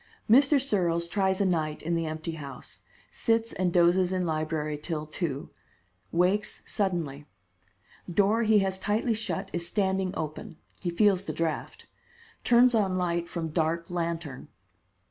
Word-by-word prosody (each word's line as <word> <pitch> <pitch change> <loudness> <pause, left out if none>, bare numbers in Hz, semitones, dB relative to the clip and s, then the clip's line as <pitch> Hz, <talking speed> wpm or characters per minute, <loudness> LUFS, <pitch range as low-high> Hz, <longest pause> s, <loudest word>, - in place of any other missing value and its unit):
Mr. 275 +5 +6
Searles 175 -10 0
tries 190 +1 +1
a - - +3
night 155 -4 -1
in 170 +2 -1
the 165 -1 0
empty 155 +1 -4
house. 140 -5 -8 0.3
Sits 230 0 +1
and 180 -1 0
dozes 175 +1 +4
in 185 -1 0
library 155 -1 -1
till 150 +1 -4
two. 155 -3 -4 0.6
Wakes 190 +5 +1
suddenly. 165 -8 -2 0.8
Door 205 +5 +3
he 220 - +6
has 190 0 -2
tightly 215 +4 0
shut 200 -3 -3
is 170 0 -2
standing 190 -1 0
open. 155 +1 -5 0.2
He 180 - -2
feels 195 +2 +3
the - - -3
draft. 165 -1 -3 0.6
Turns 245 +1 +5
on 195 -5 +2
light 170 -1 -1
from 165 -2 -3
dark 165 +2 -1
lantern. 170 -5 -3
175 Hz, 145 wpm, -28 LUFS, 160-195 Hz, 0.8 s, Mr